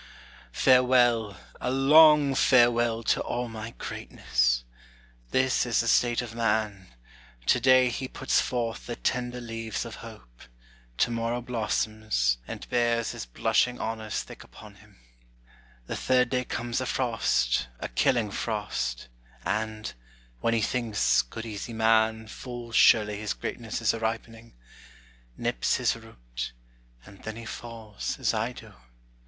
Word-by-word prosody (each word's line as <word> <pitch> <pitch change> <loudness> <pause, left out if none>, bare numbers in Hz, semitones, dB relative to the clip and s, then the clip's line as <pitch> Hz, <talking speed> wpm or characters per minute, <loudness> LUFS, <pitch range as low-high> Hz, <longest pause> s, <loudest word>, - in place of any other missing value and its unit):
Farewell, 125 -5 +4 0.2
a - - -2
long 145 +2 +6
farewell, 120 -3 +3
to - - +1
all 125 0 -3
my 110 0 -8
greatness! - - -1 0.7
This 130 0 +2
is 120 -2 +1
the 115 - -3
state 120 +1 +3
of 115 -2 -8
man: 105 -4 -1 0.6
to 125 - +4
day 130 0 +5
he 130 +2 -4
puts - - +1
forth 115 -2 -3
The 120 - -4
tender 125 0 -2
leaves 115 -1 -4
of 115 - -8
hope; 105 - -13 0.6
to 120 - +2
morrow 115 +1 -1
blossoms, 110 - -1
And - - -7
bears 120 -1 +1
his - - -7
blushing 125 - +1
honors 110 -1 -3
thick - - -12
upon - - -14
him: - - -21 0.9
The - - -4
third 125 -1 +2
day 125 -1 0
comes 120 +1 -3
a 130 - -3
frost, 115 - +1
a - - -4
killing 105 - +1
frost; 105 - -3 0.4
And 110 0 -2 0.5
when 115 0 +1
he 115 - +1
thinks, 110 -1 +2
good 90 - -8
easy 110 +1 -6
man, 110 0 +2
full 120 +1 -8
surely 105 -2 +5
His 105 -2 -3
greatness 115 -1 -5
is 110 - +3
a 115 - -4
ripening 115 - -5 0.8
nips - - 0
his - - +1
root, - - -8 0.5
And 100 - -15
then 110 0 -5
he 115 0 -9
falls, 110 -2 -6
as - - +1
I - - -1
do. - - -12
115 Hz, 140 wpm, -27 LUFS, 110-120 Hz, 0.9 s, long